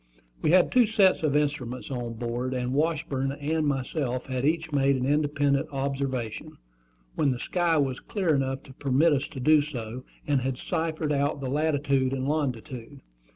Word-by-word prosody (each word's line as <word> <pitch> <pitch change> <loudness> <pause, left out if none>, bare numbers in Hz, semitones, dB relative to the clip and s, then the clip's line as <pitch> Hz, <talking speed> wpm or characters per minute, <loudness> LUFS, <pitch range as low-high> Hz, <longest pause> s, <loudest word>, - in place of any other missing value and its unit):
We - - +1
had 180 +2 +5
two 245 -3 +5
sets 205 -4 +4
of 150 -3 +1
instruments 140 -4 -1
on 120 -3 -3
board; 120 +2 -3
and 125 0 -2
Washburn 140 -3 0
and 150 +2 -1
myself 130 -2 -2
had 130 0 -2
each 160 +1 0
made 140 -1 +3
an 130 -1 -1
independent 145 -1 +1
observation, 135 -4 -3 0.6
when 150 - +1
the 125 - 0
sky 170 +4 +1
was 135 -3 0
clear 185 -6 0
enough 135 -1 -1
to 130 - -13
permit 140 +4 +2
us 145 0 0
to 160 -5 -9
do 150 +3 +5
so, 125 -4 -6 0.2
and 140 -3 +1
had 130 0 -2
ciphered 160 0 -2
out 140 +1 0
the 130 -2 -4
latitude 140 -3 +1
and 135 0 -2
longitude. 135 -2 -3
140 Hz, 170 wpm, -27 LUFS, 130-150 Hz, 0.6 s, had